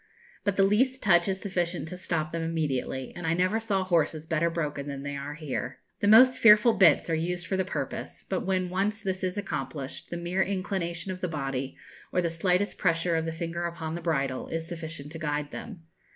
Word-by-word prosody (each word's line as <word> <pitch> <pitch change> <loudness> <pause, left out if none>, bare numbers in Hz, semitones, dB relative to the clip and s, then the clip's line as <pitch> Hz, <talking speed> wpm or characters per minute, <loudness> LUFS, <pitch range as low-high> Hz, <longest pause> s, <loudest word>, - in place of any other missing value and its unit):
But 200 -2 +1
the 195 - +4
least 255 +7 +2
touch 175 -3 +5
is 190 -1 -1
sufficient 175 -4 -2
to 180 - -6
stop 165 -4 -2
them 165 - -2
immediately, 145 -5 -2
and 175 -2 -4
I 160 - +2
never 185 +5 +2
saw 205 -4 0
horses 160 -3 +1
better 165 0 +1
broken 150 -4 -3
than 140 -1 -5
they 145 0 -4
are 140 +1 -5
here. 140 -4 -4 0.2
The 205 - +1
most 255 +5 +7
fearful 215 +1 +7
bits 170 -8 +5
are 165 - 0
used 175 +2 -1
for 190 - -1
the 190 - +1
purpose; 185 - -5
but - - 0
when 185 -2 0
once 200 +3 -1
this 190 -1 -2
is 185 +1 -1
accomplished, 150 -8 -4
the 170 - -4
mere 175 +2 -1
inclination 185 -2 -2
of 185 0 -7
the 180 - 0
body, 135 -4 -3 0.3
or - - +1
the 170 -2 0
slightest 180 +4 0
pressure 165 -2 +2
of 160 0 0
the 165 - -2
finger 170 +1 -3
upon 165 -2 -5
the 170 - -4
bridle, 140 -6 -1
is 165 0 -3
sufficient 160 -4 -7
to 165 - -7
guide 150 -1 -2
them. 200 -8 -8
170 Hz, 210 wpm, -28 LUFS, 160-190 Hz, 0.3 s, most